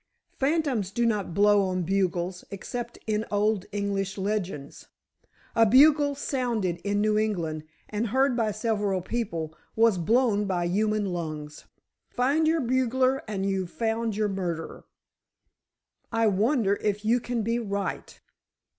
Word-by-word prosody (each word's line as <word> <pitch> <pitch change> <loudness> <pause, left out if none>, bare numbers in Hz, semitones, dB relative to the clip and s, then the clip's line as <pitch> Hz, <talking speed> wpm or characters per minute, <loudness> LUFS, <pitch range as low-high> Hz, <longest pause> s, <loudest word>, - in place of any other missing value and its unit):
Phantoms 275 - 0
do 235 +4 0
not 210 -6 -1
blow 205 0 +5
on 185 -2 -1
bugles 180 -1 -1
except 235 +4 -6
in 215 0 0
old 210 -1 +1
English 200 -1 -2
legends. 190 -8 -4 0.7
A 230 - +6
bugle 285 +5 +5
sounded 240 -10 -1
in 205 +3 -1
New 215 0 +2
England 165 -8 -2 0.2
and 215 +2 -2
heard 265 +3 +2
by 225 -3 +1
several 210 -3 -1
people, 180 -9 -3 0.2
was 225 -4 +4
blown 215 +2 +2
by 180 -3 -1
human 210 +3 +1
lungs. 155 -3 -6 0.4
Find 285 +6 +1
your 325 0 +2
bugler 260 +1 +1
and 195 -2 -2
you've 190 -2 -1
found 225 0 -1
your 215 0 +1
murderer." 175 -5 -4 1.3
"I 225 -1 +2
wonder 210 0 +2
if 210 0 -1
you 235 +3 +3
can 240 -1 -2
be 230 +2 0
right!" 200 -3 -4
210 Hz, 135 wpm, -27 LUFS, 190-235 Hz, 1.3 s, A